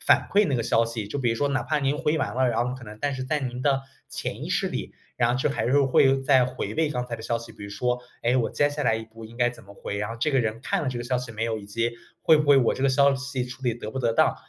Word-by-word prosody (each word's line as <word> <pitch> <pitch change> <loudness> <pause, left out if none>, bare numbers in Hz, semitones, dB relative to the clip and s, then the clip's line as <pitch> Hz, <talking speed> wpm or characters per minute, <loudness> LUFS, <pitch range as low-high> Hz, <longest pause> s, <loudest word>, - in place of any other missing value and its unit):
反 - - +4
馈 205 0 +5
那 135 - +1
个 115 - 0
消 115 - +3
息， 115 -3 -4
就 140 +7 -4
比 125 -3 +1
如 115 - 0
说 145 +2 +1
哪 130 -3 0
怕 155 +4 0
您 140 +1 0
回 150 +1 +1
完 - - -2
了， 130 0 +2
然 120 +1 +1
后 125 - -3
可 130 - -10
能 105 -1 -10
但 145 +1 -1
是 130 - -4
在 150 +4 0
您 125 -3 -4
的 135 -1 +2 0.3
潜 - - -5
意 - - -5
识 - - +1
里， - - -5 0.2
然 120 0 +2
后 125 - 0
就 135 - +1
还 135 - -1
是 140 +4 +4
会 135 0 +4
再 130 -3 +4
回 130 0 -4
味 160 -1 +1
刚 125 -4 -3
才 120 - -4
的 110 - -10
消 115 +1 0
息。 115 0 -11
比 100 - -12
如 100 - -7
说， 125 +4 -1 0.2
诶， 120 +2 +2
我 125 -3 +1
接 145 - +2
下 145 0 -4
来 115 -4 +2
一 110 - -6
步 110 0 -13
应 115 +2 -14
该 120 -1 +3
怎 120 -1 -14
么 100 0 -14
回， 100 - -5
然 105 +2 -2
后 115 - -5
这 150 +5 +1
个 135 - +4
人 110 -1 -2
看 - - 0
了 145 - -1
这 130 - -3
个 120 - -5
消 125 0 0
息 125 -2 -6
没 115 0 -3
有， 115 -1 -1
以 105 - -8
及 115 +3 -1 0.3
会 160 - +6
不 150 -1 0
会 140 - +8
我 125 -4 +3
这 - - -4
个 135 - +4
消 140 +1 +4
息 135 -1 -3
处 125 +2 -10
理 120 -3 +1
得 110 -2 -7
不 135 - -3
得 115 -2 +1
当。 - - +3
125 Hz, 360 characters per minute, -25 LUFS, 115-135 Hz, 0.3 s, 会